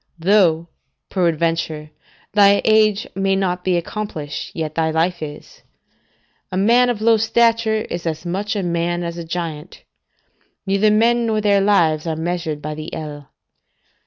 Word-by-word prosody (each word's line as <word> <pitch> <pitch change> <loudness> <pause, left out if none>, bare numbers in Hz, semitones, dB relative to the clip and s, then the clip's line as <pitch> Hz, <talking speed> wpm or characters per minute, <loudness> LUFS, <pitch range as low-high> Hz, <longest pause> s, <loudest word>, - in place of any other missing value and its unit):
Though, 170 -2 +3 0.4
peradventure, 165 -3 -1 0.4
thy 200 -1 +5
age 215 -2 +3
may 195 0 0
not 180 -2 -1
be 185 -2 +1
accomplished, 170 -5 -5
yet 155 -2 -3
thy 160 0 0
life 165 +2 0
is: 150 -1 -9 0.9
a 185 - -2
man 235 +5 +4
of 225 -3 -2
low 225 0 +4
stature 225 0 +2
is 170 0 -5
as 160 0 -4
much 200 +5 -2
a 200 - -1
man 175 0 -1
as 170 0 -5
a - - -5
giant; 165 -1 -6 0.8
neither 200 +2 +2
men 230 +2 +3
nor 220 -1 +1
their 205 -2 +3
lives 170 -6 +2
are 160 - -1
measured 160 -2 -3
by 150 +1 -4
the 155 +1 -7
ell. 145 -2 -8
180 Hz, 150 wpm, -20 LUFS, 160-210 Hz, 0.9 s, thy